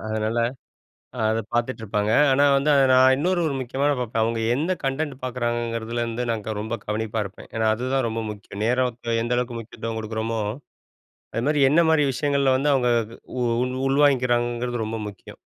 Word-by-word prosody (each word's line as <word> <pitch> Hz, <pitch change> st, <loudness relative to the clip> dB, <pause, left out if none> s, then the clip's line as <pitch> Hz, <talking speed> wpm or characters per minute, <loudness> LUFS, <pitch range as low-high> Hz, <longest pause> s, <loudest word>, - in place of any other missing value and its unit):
அதனால, 110 Hz, +1 st, -1 dB, 0.8 s
அத 110 Hz, 0 st, +1 dB
பார்த்துட்டுருப்பாங்க. 110 Hz, -3 st, -1 dB, 0.2 s
ஆனா 140 Hz, +2 st, +4 dB
வந்து 145 Hz, +2 st, +2 dB
அத 140 Hz, -, +5 dB
நான் 130 Hz, +1 st, +6 dB
இன்னொரு 175 Hz, +5 st, +1 dB
ஒரு 140 Hz, -, -1 dB
முக்கியமான 140 Hz, +3 st, 0 dB
பார்ப்பேன். 115 Hz, -2 st, -1 dB
அவங்க 115 Hz, 0 st, -1 dB
எந்த 160 Hz, +7 st, 0 dB
கன்டென்ட் 135 Hz, +1 st, -1 dB
பார்க்குறாங்கங்கிறதுலேருந்து 120 Hz, -1 st, -2 dB
நான் 110 Hz, -3 st, -2 dB
க 110 Hz, -, -2 dB
ரொம்ப 110 Hz, +2 st, -3 dB
கவனிப்பா 110 Hz, +1 st, -2 dB
இருப்பேன். 100 Hz, +2 st, -11 dB
ஏன்னா 110 Hz, 0 st, 0 dB
அதுதான் 130 Hz, +2 st, -1 dB
ரொம்ப 115 Hz, 0 st, -3 dB
முக்கியம். 100 Hz, -1 st, -9 dB
நேரத்த 120 Hz, -1 st, 0 dB
எந்த 120 Hz, +1 st, -1 dB
அளவுக்கு 120 Hz, -1 st, -3 dB
முக்கியத்துவம் 115 Hz, 0 st, -6 dB
குடுக்குறோமோ, 110 Hz, +1 st, -3 dB, 0.9 s
அது 115 Hz, -, -1 dB
மாரி 150 Hz, -1 st, +2 dB
என்ன 165 Hz, -, +5 dB
மாரி 150 Hz, -2 st, +4 dB
விஷயங்கள்ல 140 Hz, -1 st, +1 dB
வந்து 145 Hz, +2 st, +1 dB
அவங்க 125 Hz, -2 st, +2 dB, 0.5 s
உ -, -, +1 dB, 0.2 s
உள் 125 Hz, 0 st, -3 dB
உள்வாங்கிக்கிறாங்கங்கிறது 120 Hz, -4 st, +1 dB
ரொம்ப 115 Hz, +1 st, -4 dB
முக்கியம். 100 Hz, -3 st, -12 dB
120 Hz, 160 wpm, -24 LUFS, 110-135 Hz, 0.9 s, நான்